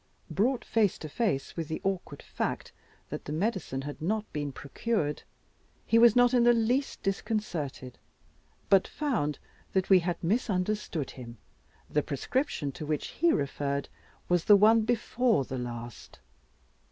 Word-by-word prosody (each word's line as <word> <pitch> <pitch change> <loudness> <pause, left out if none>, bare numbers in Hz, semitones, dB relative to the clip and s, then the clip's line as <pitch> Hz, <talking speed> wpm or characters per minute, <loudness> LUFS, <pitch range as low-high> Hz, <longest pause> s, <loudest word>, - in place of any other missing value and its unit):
Brought 245 +5 +1
face 215 -4 +2
to 155 - -7
face 155 - -1
with 165 -2 -3
the 160 - -3
awkward 190 -7 -3
fact - - -3 0.4
that - - -6
the - - -5
medicine 165 - -2
had 145 +1 -7
not 215 +6 0
been 145 -2 -2
procured, 150 - -2 0.6
he 230 - +4
was 235 -2 +7
not 245 0 +5
in 245 -1 +5
the 240 0 +6
least 245 +5 0
disconcerted, 185 - -3 0.7
but 195 -1 +4
found 225 - -1 0.4
that 190 0 0
we 190 - +8
had 175 0 -2
misunderstood 190 - -1
him, 120 -2 -10 0.5
the 150 - +1
prescription 145 - -2
to 155 - -7
which 150 -1 -2
he 340 0 +2
referred 140 - -1 0.4
was 175 -2 +1
the 210 - +8
one 220 +3 +6
before 230 - +1
the 130 0 -4
last. 120 -1 -7
185 Hz, 145 wpm, -29 LUFS, 145-225 Hz, 0.7 s, we